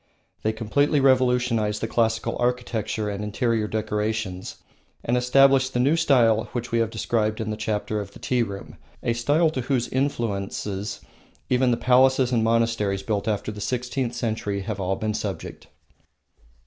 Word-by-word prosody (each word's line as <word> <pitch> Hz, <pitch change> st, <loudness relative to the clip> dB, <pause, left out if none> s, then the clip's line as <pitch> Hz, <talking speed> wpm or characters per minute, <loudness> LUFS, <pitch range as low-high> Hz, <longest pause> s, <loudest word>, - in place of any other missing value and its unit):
They 110 Hz, -, +1 dB
completely 120 Hz, +7 st, +1 dB
revolutionised 125 Hz, -5 st, +2 dB
the 115 Hz, -, -2 dB
classical 115 Hz, -1 st, 0 dB
architecture 120 Hz, -3 st, -1 dB
and 100 Hz, 0 st, -3 dB
interior 110 Hz, +1 st, 0 dB
decorations, 105 Hz, -3 st, -2 dB, 0.5 s
and 120 Hz, -, 0 dB
established 130 Hz, +1 st, +4 dB
the -, -, +2 dB
new 140 Hz, +6 st, +3 dB
style 120 Hz, -9 st, +3 dB
which 120 Hz, 0 st, -4 dB
we 115 Hz, -, +2 dB
have 115 Hz, -1 st, +1 dB
described 110 Hz, -2 st, -1 dB
in 110 Hz, -1 st, -2 dB
the -, -, -2 dB
chapter 110 Hz, 0 st, -2 dB
of 100 Hz, -1 st, -6 dB
the -, -, -11 dB
tea 125 Hz, -1 st, 0 dB
room, 100 Hz, -4 st, -5 dB, 0.3 s
a 120 Hz, -, +1 dB
style 145 Hz, +8 st, +2 dB
to 130 Hz, -, -3 dB
whose 125 Hz, -1 st, 0 dB
influence 120 Hz, -8 st, -2 dB, 0.9 s
even 125 Hz, 0 st, +3 dB
the 120 Hz, -, +2 dB
palaces 130 Hz, 0 st, +4 dB
and 115 Hz, -3 st, +2 dB
monasteries 115 Hz, -4 st, +1 dB
built 105 Hz, 0 st, -2 dB
after 105 Hz, 0 st, -1 dB
the 105 Hz, 0 st, -8 dB
sixteenth 125 Hz, +2 st, -2 dB
century 110 Hz, -4 st, -2 dB
have 95 Hz, -, -4 dB
all 95 Hz, 0 st, 0 dB
been 110 Hz, +1 st, -2 dB
subject. 100 Hz, -5 st, -5 dB
115 Hz, 160 wpm, -24 LUFS, 105-125 Hz, 0.9 s, established